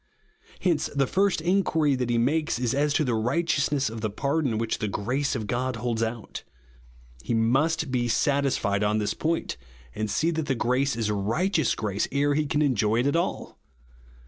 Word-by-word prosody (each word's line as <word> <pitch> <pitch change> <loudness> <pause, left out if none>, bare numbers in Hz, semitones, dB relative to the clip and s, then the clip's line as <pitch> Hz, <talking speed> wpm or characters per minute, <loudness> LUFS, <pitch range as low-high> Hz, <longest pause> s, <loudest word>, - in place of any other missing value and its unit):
Hence 170 -5 +1
the 140 -1 +3
first 195 +3 +1
inquiry 165 -4 +2
that 125 -2 -1
he 120 - +2
makes 150 +6 +1
is 125 0 -1
as 145 +2 +1
to - - +3
the 125 -4 0
righteousness 145 +3 +1
of 110 0 -5
the 110 - -1
pardon 140 +2 -1
which 115 0 -2
the 105 - -1
grace 130 +8 -1
of 110 -4 -3
God 125 +3 -1
holds 115 0 -2
out. 115 -1 -4 0.8
He 115 - -1
must 135 +7 +1
be 120 -2 0
satisfied 130 -6 +1
on 105 +1 +1
this 105 -1 0
point, 165 +1 -2 0.4
and 110 +7 -3
see 160 +11 +1
that 160 -2 -3
the 135 - +1
grace 125 +3 +1
is 110 -2 -1
righteous 145 - 0
grace, 105 -1 -1
ere 145 +1 +2
he 150 +1 0
can 150 +1 +1
enjoy 115 -4 +2
it - - -2
at 140 - +1
all. 170 - -2
130 Hz, 185 wpm, -26 LUFS, 115-150 Hz, 0.8 s, the